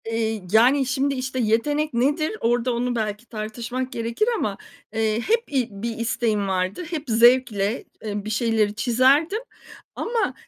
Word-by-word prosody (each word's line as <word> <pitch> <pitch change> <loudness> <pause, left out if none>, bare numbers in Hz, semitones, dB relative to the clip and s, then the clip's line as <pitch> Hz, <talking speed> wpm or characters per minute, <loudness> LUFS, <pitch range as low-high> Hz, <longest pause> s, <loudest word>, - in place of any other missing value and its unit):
Eee, 225 -2 -2
yani, 255 +6 +5
şimdi, 275 +1 0
işte, 260 0 -3
"Yetenek 290 +7 +1
nedir?" 290 +6 +1
Orada 240 +1 +1
onu 245 +1 -1
belki 215 0 -3
tartışmak 235 +4 -5
gerekir 230 - -1
ama, 205 - -2 0.4
eee, 220 0 +1
hep 460 - +1
i 255 -4 +1
bir 225 +3 -5
isteğim 225 -3 0
vardı, 185 - -1
hep 320 -4 -3
zevkle, 235 -2 +3 0.2
eee, 205 -1 -4
bir - - -4
şeyleri 215 -1 +1
çizerdim 265 - +3 0.6
ama, 460 0 -1
235 Hz, 145 wpm, -23 LUFS, 220-260 Hz, 0.6 s, yani